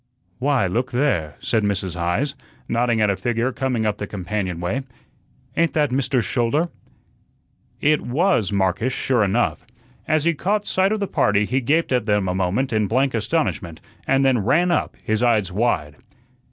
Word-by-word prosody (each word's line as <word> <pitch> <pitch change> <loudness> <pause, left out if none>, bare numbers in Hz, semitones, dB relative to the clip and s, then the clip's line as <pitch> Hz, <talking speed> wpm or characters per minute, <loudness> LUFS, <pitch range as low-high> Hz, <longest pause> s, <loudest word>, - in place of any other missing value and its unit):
"Why, 135 -4 +2
look 120 +8 -1
there," 105 - 0
said 110 - +1
Mrs. 100 -3 -1
Heise, 90 +12 -1 0.3
nodding 115 -1 +1
at 105 -1 +3
a - - 0
figure 120 +3 -1
coming 125 -3 -1
up 105 -1 -1
the 105 - -4
companion 95 -2 -3
way. 90 +10 -2 0.7
"Ain't 170 0 +2
that 150 -4 +2
Mr. 130 -1 +1
Schouler?" 135 +10 0 1.1
It 150 +1 +3
was 130 - +1
Marcus, 100 +5 +1
sure 125 -5 +1
enough. 105 +5 0 0.4
As 155 -1 +2
he 170 +1 +2
caught 205 +7 -1
sight 190 +1 +1
of 215 -1 -1
the - - +1
party 105 - +2
he 130 +5 0
gaped 155 +7 +1
at 125 -4 +1
them 105 -2 +2
a 90 - 0
moment 95 +8 0
in 110 -2 +1
blank 130 +4 +1
astonishment, 105 - -1 0.3
and 135 0 +3
then 130 -3 +3
ran 170 - +2
up, - - 0
his 110 +1 0
eyes 110 -6 +2
wide. 90 -9 -1
120 Hz, 170 wpm, -22 LUFS, 100-135 Hz, 1.1 s, at